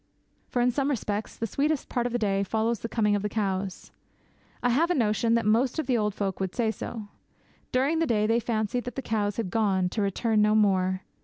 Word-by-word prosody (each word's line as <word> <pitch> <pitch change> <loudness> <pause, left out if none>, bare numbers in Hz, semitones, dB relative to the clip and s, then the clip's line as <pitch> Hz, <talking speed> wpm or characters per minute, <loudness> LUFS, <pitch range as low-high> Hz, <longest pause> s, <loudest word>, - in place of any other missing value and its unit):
For, 245 - +1
in 250 - +3
some 275 +3 0
respects, 215 -5 -2
the 230 - -2
sweetest 290 +6 -1
part 240 -1 -1
of - - -5
the 240 - 0
day 200 -4 +1
follows 220 +3 0
the 230 - -5
coming 210 -3 +2
of 205 - -1
the 210 - -2
cows. 195 -3 -3 0.7
I 245 - +3
have 305 +8 +2
a 355 - +2
notion 230 -1 +2
that 230 - +1
most 235 +6 +2
of 315 - -1
the 255 -1 +1
old 210 -3 0
folk 195 -3 -2
would 190 -1 -3
say 230 -3 +1
so. 220 -1 -7 0.6
During 275 +6 +2
the 330 - +1
day 215 -4 +2
they 225 +2 +3
fancied 230 +1 -1
that 245 - -6
the 270 - -4
cows 205 -3 -1
had 215 -6 -2
gone, 190 -4 +1
to 210 - -2
return 210 +2 +1
no 210 0 +4
more. 190 -3 +2
220 Hz, 230 wpm, -27 LUFS, 205-245 Hz, 0.7 s, no